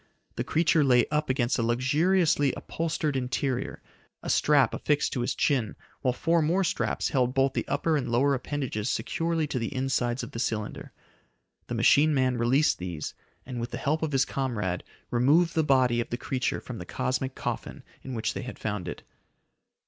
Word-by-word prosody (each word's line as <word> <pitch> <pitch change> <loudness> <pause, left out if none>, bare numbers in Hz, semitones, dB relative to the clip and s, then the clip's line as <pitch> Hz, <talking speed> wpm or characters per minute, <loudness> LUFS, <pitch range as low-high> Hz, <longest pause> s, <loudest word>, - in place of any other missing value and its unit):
The - - -1
creature 165 -1 +3
lay 125 -3 +4
up 150 -1 0
against 130 -1 +1
a - - +2
luxuriously 145 +5 +2
upholstered 160 -3 -2
interior, 130 0 -2 0.4
a - - -1
strap - - +4
affixed 150 -1 0
to 125 - -1
his 120 - -1
chin 125 -8 +1 0.3
while 130 - +2
four 165 +6 +1
more 170 +5 +2
straps 170 - -1
held 125 -2 +1
both 135 0 +3
the - - -2
upper 155 +3 +1
and 140 - -1
lower 135 +4 +3
appendages 130 -4 -2
securely 165 -1 -1
to 130 - -2
the 115 - -3
insides 130 -2 0
of 120 - -7
the 115 - -6
cylinder. 110 -3 -3 0.8
The - - -3
machine 150 +1 +4
man 130 -2 +1
released 130 +6 +3
these, 90 -4 -5 0.3
and 125 -1 -5
with 120 +1 -3
the - - -5
help 155 +3 0
of 160 -2 -1
his 135 -1 +3
comrade 105 -10 -2 0.3
removed 150 +8 +3
the 160 - +2
body 130 -4 +3
of - - -6
the 120 - -2
creature 130 +1 -2
from - - -7
the - - -7
cosmic 130 +1 -2
coffin - - -5 0.2
in 130 -1 -6
which 110 -1 -1
they - - -4
had 125 - -7
found 105 -5 -3
it. - - -6
130 Hz, 185 wpm, -27 LUFS, 120-150 Hz, 0.8 s, lay